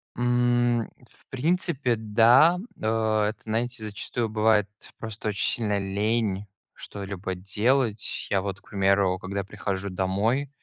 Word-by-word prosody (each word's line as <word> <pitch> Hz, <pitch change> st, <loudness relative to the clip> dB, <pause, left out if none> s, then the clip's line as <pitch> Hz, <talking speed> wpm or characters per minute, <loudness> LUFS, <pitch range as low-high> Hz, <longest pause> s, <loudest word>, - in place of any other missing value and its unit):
М, 120 Hz, -1 st, +2 dB, 0.2 s
в -, -, -22 dB
принципе, 145 Hz, -3 st, 0 dB
да. 115 Hz, +10 st, +5 dB, 0.2 s
Э, 110 Hz, -1 st, +1 dB
это, 105 Hz, -, -7 dB
знаете, 115 Hz, +1 st, -2 dB
зачастую 110 Hz, +2 st, -3 dB
бывает 110 Hz, -1 st, +3 dB, 0.3 s
просто 110 Hz, -1 st, -4 dB
очень 105 Hz, -1 st, 0 dB
сильно 105 Hz, -3 st, -1 dB
лень 100 Hz, +1 st, -1 dB, 0.3 s
что-либо 100 Hz, -2 st, -6 dB
делать. 105 Hz, +4 st, 0 dB
Я, 95 Hz, -, +1 dB
вот, 95 Hz, -1 st, -4 dB
к -, -, -26 dB
примеру, 95 Hz, -2 st, +2 dB
когда 100 Hz, +1 st, -4 dB
прихожу 100 Hz, 0 st, -4 dB
домой, 100 Hz, +9 st, 0 dB
110 Hz, 125 wpm, -26 LUFS, 100-120 Hz, 0.3 s, да